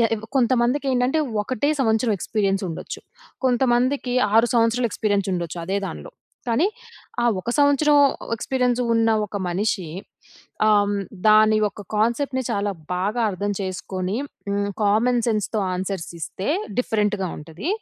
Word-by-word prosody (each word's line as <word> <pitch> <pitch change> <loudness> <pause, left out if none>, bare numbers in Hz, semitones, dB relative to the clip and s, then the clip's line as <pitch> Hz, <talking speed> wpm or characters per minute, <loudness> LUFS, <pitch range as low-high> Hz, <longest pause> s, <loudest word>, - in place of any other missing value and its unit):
య - - +5 0.3
కొంతమందికి 255 +2 +2
ఏంటంటే, 250 +5 +1 0.2
ఒకటే 255 +5 -1
సంవత్సరం 225 -1 +2
ఎక్స్పీరియన్స్ 195 0 0
ఉండొచ్చు. 165 - -6 0.4
కొంతమందికి, 250 +1 +2 0.2
6 230 +1 +6
సంవత్సరాలు 235 +1 +2
ఎక్స్పీరియన్స్ 205 -3 0
ఉండొచ్చు 170 -1 -4
అదే 190 +3 -1
దాంట్లో. - - -8 0.4
కానీ, 235 +10 +3 0.6
ఆ - - +2 0.2
ఒక 235 - -4
సంవత్సరం 290 +1 +4 0.4
ఎక్స్పీరియన్స్ 250 +1 0
ఉన్న 225 0 +3 0.2
ఒక 205 - -6
మనిషి 190 +1 -1 0.8
ఆహ్, 210 -1 +5
హ్మ్, 205 0 -1 0.3
దాని 215 0 +6
యొక్క 205 0 -3
కాన్సెప్ట్‌ని 255 +5 0
చాలా 205 -2 0 0.2
బాగా 205 +6 -1
అర్థం 205 +2 -2
చేసుకొని 185 +1 -3 0.3
హ్మ్, 200 0 0
కామన్ 230 +4 +3
సెన్స్‌తో 215 -1 0 0.2
ఆన్సర్స్ 185 -2 -4
ఇస్తే 190 +5 -5 0.3
డిఫరెంట్‌గా 210 -5 0
ఉంటది. 160 - -7
215 Hz, 130 wpm, -23 LUFS, 200-245 Hz, 0.8 s, 6